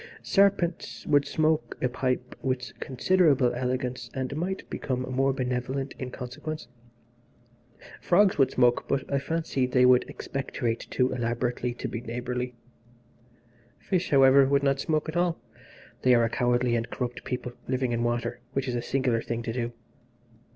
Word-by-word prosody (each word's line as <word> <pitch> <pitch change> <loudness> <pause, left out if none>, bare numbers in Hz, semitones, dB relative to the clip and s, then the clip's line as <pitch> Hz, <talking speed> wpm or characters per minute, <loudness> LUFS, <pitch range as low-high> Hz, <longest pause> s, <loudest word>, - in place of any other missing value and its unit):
Serpents 195 -4 +1
would 145 -1 +3
smoke 155 +1 0
a 125 - +1
pipe 125 0 -2
with 125 -3 -2
considerable 140 -2 +3
elegance, 125 -1 -2
and 130 +1 -3
might 185 +5 -3
become 130 -2 -3
more 130 +2 +1
benevolent 130 +1 -2
in 130 - -4
consequence. 125 +2 -6 1.3
Frogs 195 +2 +4
would 135 -2 +5
smoke, 120 -2 +3
but 140 -1 0
I 140 - +3
fancy 150 -3 -1
they 125 0 +4
would 125 0 +5
expectorate 120 -4 -3
too 130 0 +1
elaborately 120 0 -1
to - - -4
be 115 - -5
neighbourly. 125 +1 -4 1.2
Fish, 185 -2 -1
however, 135 -1 +6
would 140 0 +2
not 135 -1 +2
smoke 155 0 0
at 160 - -5
all. 175 -3 +1 0.6
They 125 -1 +5
are 120 - +4
a 115 - +2
cowardly 120 -1 +2
and 115 0 -2
corrupt 125 -1 -4
people, 125 -1 -4 0.2
living 130 -1 0
in 120 0 0
water, 120 0 -1
which 135 0 -1
is 125 - -1
a 120 - -1
singular 125 -2 0
thing 115 0 -4
to 115 - -3
do. 120 -1 -2
130 Hz, 155 wpm, -27 LUFS, 125-140 Hz, 1.3 s, however